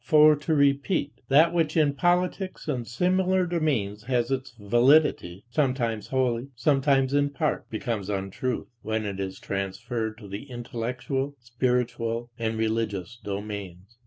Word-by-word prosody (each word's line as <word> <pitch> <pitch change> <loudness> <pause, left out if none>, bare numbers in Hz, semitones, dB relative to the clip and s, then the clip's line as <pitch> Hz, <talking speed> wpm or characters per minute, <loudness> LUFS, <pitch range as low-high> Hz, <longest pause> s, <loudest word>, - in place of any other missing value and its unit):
For 155 0 +6
to 150 +2 -1
repeat: 140 +2 +1
that 160 +5 +5
which 165 -2 +1
in 150 -3 +4
politics 180 +5 0
and 125 -6 -2
similar 185 +6 +2
domains 130 - -1
has 125 -1 0
its 130 -1 -3
validity, 120 - +3
sometimes 120 -5 0
wholly, 130 -1 0
sometimes 135 +1 +2
in 145 0 +3
part, 150 +2 -2
becomes 110 -3 -3
untruth, 100 +5 -2 0.2
when 110 0 -2
it 100 -1 -4
is 95 0 -4
transferred 110 +3 -3
to 105 -3 -11
the 100 +8 -7
intellectual, 125 +3 -3
spiritual, 120 -1 -1
and 110 -1 -1
religious 110 -1 -2
domains. 100 -1 -6
125 Hz, 130 wpm, -26 LUFS, 110-145 Hz, 0.2 s, For